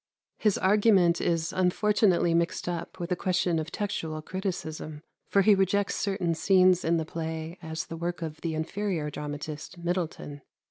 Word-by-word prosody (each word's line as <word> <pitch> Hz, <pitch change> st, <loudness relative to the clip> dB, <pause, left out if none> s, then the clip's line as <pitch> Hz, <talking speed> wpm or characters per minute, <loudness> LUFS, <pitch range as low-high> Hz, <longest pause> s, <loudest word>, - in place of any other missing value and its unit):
His 210 Hz, -3 st, +2 dB
argument 190 Hz, -4 st, +4 dB
is 165 Hz, -1 st, 0 dB
unfortunately 185 Hz, -1 st, +3 dB
mixed 170 Hz, +1 st, 0 dB
up 175 Hz, +1 st, -4 dB
with 175 Hz, +1 st, -4 dB
a -, -, +3 dB
question 180 Hz, -2 st, +1 dB
of 155 Hz, 0 st, -5 dB
textual 160 Hz, -6 st, -3 dB
criticism; 160 Hz, -5 st, -5 dB, 0.3 s
for 200 Hz, -, +4 dB
he 210 Hz, -, +6 dB
rejects 195 Hz, +1 st, +2 dB
certain 195 Hz, -4 st, -1 dB
scenes 185 Hz, +1 st, +4 dB
in 165 Hz, +1 st, +2 dB
the 160 Hz, -, -1 dB
play 160 Hz, +1 st, -5 dB
as 160 Hz, -1 st, -4 dB
the 165 Hz, -, -7 dB
work 175 Hz, 0 st, -3 dB
of 155 Hz, -1 st, -6 dB
the 165 Hz, -2 st, -2 dB
inferior 160 Hz, -1 st, -2 dB
dramatist 150 Hz, +3 st, -6 dB
Middleton. 170 Hz, -4 st, -3 dB
170 Hz, 155 wpm, -28 LUFS, 160-190 Hz, 0.3 s, he